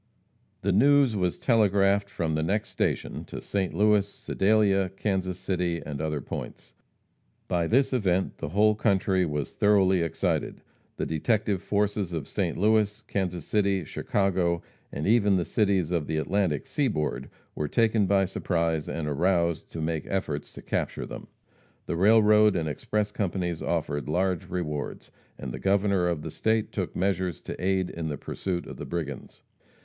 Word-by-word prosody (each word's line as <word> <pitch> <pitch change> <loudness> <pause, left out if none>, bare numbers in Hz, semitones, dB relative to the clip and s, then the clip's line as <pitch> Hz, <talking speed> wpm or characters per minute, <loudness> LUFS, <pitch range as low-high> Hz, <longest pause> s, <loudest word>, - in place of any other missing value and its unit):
The 100 - +1
news 135 +3 +4
was 90 -3 0
telegraphed 100 -3 +3
from 85 -4 -2
the 80 - 0
next 100 +6 -1
station - - -2
to - - -7
St. 95 -3 -2
Louis, 105 -1 +3
Sedalia, 100 -2 +2
Kansas 95 -1 -2
City 90 -3 -1
and 75 -1 -5
other 75 -2 -2
points. - - -7 0.7
By 85 -2 0
this 135 +6 +2
event 95 -6 0
the - - -4
whole 105 +5 +4
country 95 -3 +1
was 75 -2 -3
thoroughly 95 -3 +3
excited. 85 -2 -1 0.3
The - - -1
detective 100 +4 0
forces 100 -3 -1
of 80 -3 -3
St. - - -2
Louis, 105 +1 +2
Kansas 90 -4 -2
City, 100 -3 +1
Chicago, 90 -1 0 0.3
and 75 - -4
even 105 -2 +4
the 90 -2 0
cities 95 -6 +1
of 85 -4 0
the 80 - -1
Atlantic 85 -2 0
seaboard 75 - -1 0.2
were 75 - -2
taken 110 +2 +2
by 95 0 +3
surprise, 85 -4 -1
and 80 -2 -3
aroused 85 +2 0
to 80 - -4
make 80 -1 -2
efforts 75 -7 -3
to - - -11
capture - - -2
them. - - -9 0.6
The - - -2
railroad 105 +2 +5
and 80 -3 -1
express 105 +8 -2
companies 90 -4 -2
offered 75 -5 -2
large 90 0 0
rewards, 75 -6 -4 0.3
and 65 - -6
the - - -6
Governor 100 -2 +2
of 85 -4 -2
the - - -5
state 110 -1 0
took 95 -4 -3
measures 95 -3 0
to - - -7
aid 95 -1 +1
in 80 -1 -4
the 75 -2 -3
pursuit 90 +4 -4
of - - -9
the - - -6
brigands. 75 -6 -5
95 Hz, 160 wpm, -27 LUFS, 85-100 Hz, 0.7 s, railroad